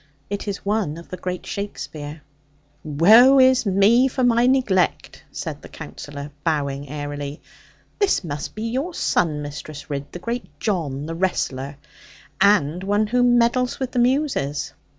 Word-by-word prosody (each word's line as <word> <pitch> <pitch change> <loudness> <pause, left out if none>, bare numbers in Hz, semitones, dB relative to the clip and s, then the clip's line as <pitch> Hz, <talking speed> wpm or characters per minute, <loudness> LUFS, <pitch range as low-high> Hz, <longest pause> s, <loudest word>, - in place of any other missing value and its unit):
It 205 +1 -4
is 200 -1 -4
one 200 -7 0
of 170 - -12
the 185 - -6
great 180 -1 -5
Shakespeare.' 155 -7 -6 0.6
'Woe 215 - +6
is 260 -2 +5
me 205 +7 +5
for 260 0 -2
my 240 0 +4
neglect!' 245 -9 +1
said - - -6
the - - -12
Counsellor, 145 0 -8
bowing 145 -4 -1
airily; 145 0 -5 0.6
'this 405 - +2
must 145 -3 -5
be 215 - -5
your 265 +10 -2
son, 150 -4 0
Mistress 145 0 -8
Ridd, 140 0 -4
the - - -6
great 235 +7 -5
John, 150 -9 -2
the 165 - -4
wrestler. 140 -6 -2 0.6
And 180 -4 +3
one 205 +2 +1
who 245 +4 +1
meddles 245 +1 +3
with 260 -2 -3
the 250 - 0
Muses! 245 - 0
190 Hz, 150 wpm, -22 LUFS, 145-240 Hz, 0.6 s, Woe